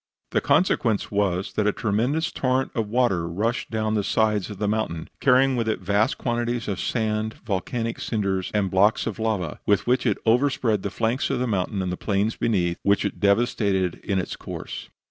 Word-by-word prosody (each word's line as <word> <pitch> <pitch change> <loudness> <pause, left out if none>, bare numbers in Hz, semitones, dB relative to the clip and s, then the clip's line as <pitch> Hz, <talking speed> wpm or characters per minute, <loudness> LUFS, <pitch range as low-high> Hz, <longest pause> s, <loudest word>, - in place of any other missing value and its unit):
The - - +2
consequence 115 - +2
was, 100 -2 0
that 105 -1 +1
a - - +4
tremendous 120 +11 0
torrent 130 0 0
of 110 -2 -1
water 105 -7 +1
rushed 110 +8 -2
down 110 -1 -1
the 105 -2 +1
sides 105 -2 +1
of 105 - -7
the 105 +1 -1
mountain, 105 -7 -2
carrying 130 0 +4
with 115 -2 0
it 110 - -1
vast 100 +3 +1
quantities 120 -1 -2
of 100 -3 -2
sand, 110 -1 -1
volcanic 115 +3 -2
cinders 95 -4 -1
and 100 -3 0
blocks 100 +3 +3
of 115 -2 -4
lava, 105 -8 -1
with 100 -1 +3
which 125 +1 +2
it 105 - +2
overspread 115 -3 +2
the 100 - -2
flanks 115 +5 -1
of 135 - 0
the 125 - 0
mountain 100 -3 -1
and 90 - -2
the 90 - -3
plains 105 +2 0
beneath, 90 -6 0
which 100 0 +2
it - - -3
devastated 100 -3 +1
in 100 - -1
its 90 - -2
course. - - -7
110 Hz, 190 wpm, -24 LUFS, 100-115 Hz, -, a